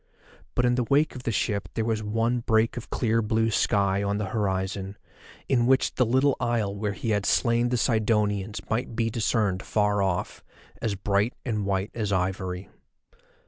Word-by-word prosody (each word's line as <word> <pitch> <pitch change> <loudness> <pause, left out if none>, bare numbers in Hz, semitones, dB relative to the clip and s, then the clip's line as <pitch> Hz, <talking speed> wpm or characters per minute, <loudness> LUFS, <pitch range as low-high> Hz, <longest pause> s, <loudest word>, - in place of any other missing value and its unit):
But 125 - +2
in 120 - +3
the 125 0 +1
wake 145 +5 +2
of 125 - -8
the - - +1
ship 100 -3 -1
there 110 - 0
was 110 -1 0
one 115 +3 0
break 110 -1 +2
of 120 - -7
clear 115 -1 +1
blue 110 +1 +1
sky 100 -1 +2
on 100 0 0
the 105 - -2
horizon, 95 -2 -2 0.5
in 120 -3 +2
which 130 0 +3
the 125 - +2
little 130 +3 +3
isle 110 -4 0
where 105 0 -2
he 110 +3 -3
had 105 -2 +1
slain 115 +10 +2
the 125 - +1
Sidonians 105 -3 +1
might 115 +1 -2
be 115 0 0
discerned 105 -4 0
far 105 -1 +1
off, 95 -2 -2 0.4
as 110 -3 -1
bright 100 +4 0
and 105 -5 -1
white 95 +1 -1
as 105 -3 -2
ivory. 95 0 -2
110 Hz, 180 wpm, -26 LUFS, 100-115 Hz, 0.5 s, in